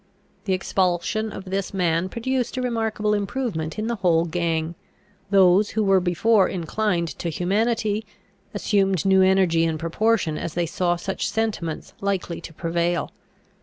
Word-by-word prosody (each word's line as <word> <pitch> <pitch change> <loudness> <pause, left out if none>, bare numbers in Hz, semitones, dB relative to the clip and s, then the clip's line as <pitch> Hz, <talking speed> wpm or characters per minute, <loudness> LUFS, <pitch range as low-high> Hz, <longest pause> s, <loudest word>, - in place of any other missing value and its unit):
The 195 - +1
expulsion 185 +3 0
of 195 - -8
this 195 +1 -3
man 175 0 +1
produced 250 +3 -2
a - - 0
remarkable 220 -3 0
improvement 205 -6 -2
in 215 - -2
the 235 0 -2
whole 170 -3 +2
gang. 165 -1 -1 0.6
Those 195 +1 +5
who 220 - 0
were 195 -1 +4
before 190 +4 +3
inclined 175 0 -1
to 170 - -2
humanity, 215 +5 0 0.4
assumed 195 -4 +1
new 190 -1 +5
energy 185 -3 +4
in 165 -1 0
proportion 170 0 0
as 165 - -5
they 175 0 +1
saw 175 +1 0
such 190 +3 -3
sentiments 205 -8 -3
likely 195 -4 -2
to - - -9
prevail. 170 0 -1
190 Hz, 145 wpm, -23 LUFS, 170-215 Hz, 0.6 s, Those